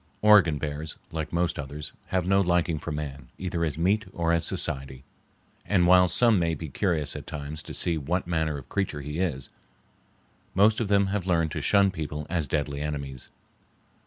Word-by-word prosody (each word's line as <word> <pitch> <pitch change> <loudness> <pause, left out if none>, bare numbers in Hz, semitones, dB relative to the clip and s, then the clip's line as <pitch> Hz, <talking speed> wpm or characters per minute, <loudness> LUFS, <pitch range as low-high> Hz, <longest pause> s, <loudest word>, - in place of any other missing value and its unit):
Oregon 105 -8 +6
bears, 75 +1 -5
like 80 -1 -4
most 85 -2 0
others, 75 +1 -6 0.2
have 90 -2 0
no 95 +1 +4
liking 85 -3 +1
for - - -5
man 70 -3 -5
either 85 -2 -2
as 75 -2 -1
meat 100 +6 +1
or 85 0 +1
as 85 - +1
society; 65 -1 -2 0.6
and 95 -4 +2
while 90 +1 +6
some 110 +4 +4
may 85 -1 +1
be 80 -2 -7
curious 80 -2 -1
at - - -7
times 75 +1 -5
to - - -10
see 85 -2 0
what 85 +6 -1
manner 80 -3 -1
of 70 - -10
creature 95 -7 -2
he 75 +3 -5
is, 70 -9 -2 1.1
most 105 +3 +4
of 115 - -1
them 100 0 +4
have 100 -3 -2
learned 80 -3 +2
to 75 - -3
shun 100 +6 +4
people 75 -3 -5
as 85 -5 0
deadly 70 0 -2
enemies. 70 -4 -5
80 Hz, 185 wpm, -27 LUFS, 75-90 Hz, 1.1 s, Oregon